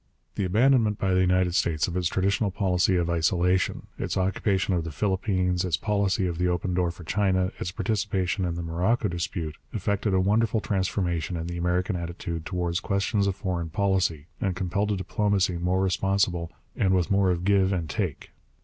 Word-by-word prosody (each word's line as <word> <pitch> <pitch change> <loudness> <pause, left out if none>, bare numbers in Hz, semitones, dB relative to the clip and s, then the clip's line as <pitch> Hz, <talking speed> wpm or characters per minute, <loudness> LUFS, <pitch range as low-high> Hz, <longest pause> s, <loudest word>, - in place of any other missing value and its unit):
The 100 - -1
abandonment 110 +1 +3
by 95 -1 0
the 95 - +3
United 90 -1 +2
States 80 -3 +1
of 90 - -5
its 90 -2 +1
traditional 100 +4 +1
policy 95 -1 +1
of 85 -1 +1
isolation, 90 +2 +1
its - - -2
occupation 95 +1 +1
of 85 -2 0
the 80 - -5
Philippines, 95 -1 0
its 90 -4 0
policy 100 -2 0
of 85 -2 -3
the 90 - +2
open 90 +1 -1
door 90 -1 +1
for 85 +1 -9
China, 95 +1 +1
its - - -2
participation 95 -2 -1
in 85 -2 -1
the 85 - -4
Morocco 95 +7 0
dispute, 85 -3 -4 0.2
effected 100 0 0
a - - +4
wonderful 110 +4 +2
transformation 90 -4 -1
in 80 - -4
the 85 0 -5
American 90 +3 0
attitude 85 -1 -5
towards 90 -1 -1
questions 100 0 0
of 95 - 0
foreign 90 -4 -3
policy 90 -4 0 0.2
and 95 -2 0
compelled 100 +3 -1
a 100 - 0
diplomacy 95 -2 0
more 90 +2 +1
responsible 95 -2 0 0.2
and 95 -1 +2
with 90 0 0
more 100 -1 +3
of 90 0 -1
give 100 -1 +3
and 85 -4 -1
take. - - -3
95 Hz, 185 wpm, -26 LUFS, 85-100 Hz, 0.2 s, a